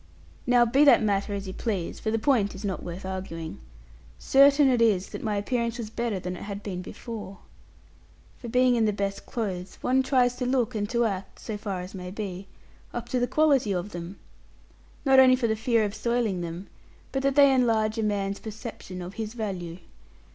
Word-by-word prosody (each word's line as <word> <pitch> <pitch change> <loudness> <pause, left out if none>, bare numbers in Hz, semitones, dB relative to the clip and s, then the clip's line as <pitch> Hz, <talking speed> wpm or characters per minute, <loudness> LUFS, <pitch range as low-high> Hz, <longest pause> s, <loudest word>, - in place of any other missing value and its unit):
Now 245 -1 +5
be 265 +5 +4
that 275 - +6
matter 200 -1 0
as 200 -1 -3
you 185 - -5
please 195 -5 -3
for 220 - -2
the 225 - +1
point 220 -5 +2
is 195 +3 -7
not 190 -2 -2
worth 175 +2 -7
arguing 185 -4 -5 0.6
certain 280 +1 +5
it 250 -3 +3
is 205 -5 +3
that - - -7
my 215 -2 -1
appearance 235 +2 -1
was 220 -3 -6
better 230 -4 -2
than 180 0 -4
it - - -9
had 200 0 -6
been 185 -3 -4
before. 205 -1 -8 1.0
For 240 - -8
being 250 +1 +4
in 230 -2 +3
the 210 - +1
best 200 0 -3
clothes, 190 -5 -4
one 260 +1 +3
tries 255 -2 +2
to 250 -1 -2
look 250 -1 +1
and 205 -2 -2
to 235 -1 +2
act 195 -3 -4
(so 220 - -6
far 200 -3 -4
as 180 +1 -9
may 180 -2 -6
be) 195 -1 -6 0.4
up 240 - -5
to 255 - 0
the 245 - +1
quality 270 -6 +3
of 180 +3 -3
them. 175 +3 -7 0.9
Not 270 -1 +6
only 255 -1 +7
for 250 -2 -1
the 220 -1 +1
fear 225 0 +2
of 200 - -3
soiling 220 -4 0
them, 170 +2 -5 0.5
but 270 - -1
that 275 0 +1
they 280 -2 +7
enlarge 225 -3 +2
a - - +1
man's 200 -2 -1
perception 215 -4 -7
of 180 +2 -8
his 220 +2 -5
value. 185 -7 -4
215 Hz, 205 wpm, -26 LUFS, 195-245 Hz, 1.0 s, only